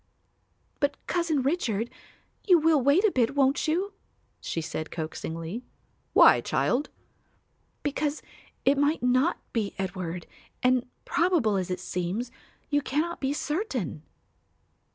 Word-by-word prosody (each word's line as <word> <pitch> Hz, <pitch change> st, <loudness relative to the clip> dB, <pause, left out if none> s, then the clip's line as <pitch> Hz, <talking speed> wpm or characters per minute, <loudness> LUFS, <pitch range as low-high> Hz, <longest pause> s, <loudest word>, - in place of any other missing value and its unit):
"But, 285 Hz, -1 st, +1 dB
Cousin 335 Hz, -6 st, 0 dB
Richard, 240 Hz, -, 0 dB, 0.6 s
you 360 Hz, -3 st, +8 dB
will 315 Hz, -2 st, +4 dB
wait 285 Hz, -, +4 dB
a 425 Hz, -, +4 dB
bit, 250 Hz, -1 st, +1 dB
won't 275 Hz, +2 st, +2 dB
you?" 370 Hz, +6 st, 0 dB, 0.5 s
she -, -, -3 dB
said 155 Hz, 0 st, -4 dB
coaxingly. 165 Hz, +5 st, -5 dB, 0.5 s
"Why, -, -, +7 dB
child?" 275 Hz, +5 st, 0 dB, 0.9 s
"Because 290 Hz, +1 st, -1 dB, 0.4 s
it 275 Hz, +1 st, +4 dB
might 290 Hz, -1 st, +2 dB
not 255 Hz, +7 st, +3 dB, 0.2 s
be 215 Hz, -4 st, -1 dB
Edward, 180 Hz, -2 st, -4 dB, 0.4 s
and, 250 Hz, -1 st, +3 dB, 0.2 s
probable 330 Hz, -, +2 dB
as 185 Hz, -2 st, -1 dB
it 180 Hz, 0 st, -2 dB
seems, 185 Hz, +7 st, -3 dB, 0.4 s
you 290 Hz, 0 st, +3 dB
cannot 310 Hz, +5 st, -1 dB
be 270 Hz, 0 st, 0 dB
certain." 290 Hz, -, -2 dB
265 Hz, 120 wpm, -27 LUFS, 195-305 Hz, 0.9 s, you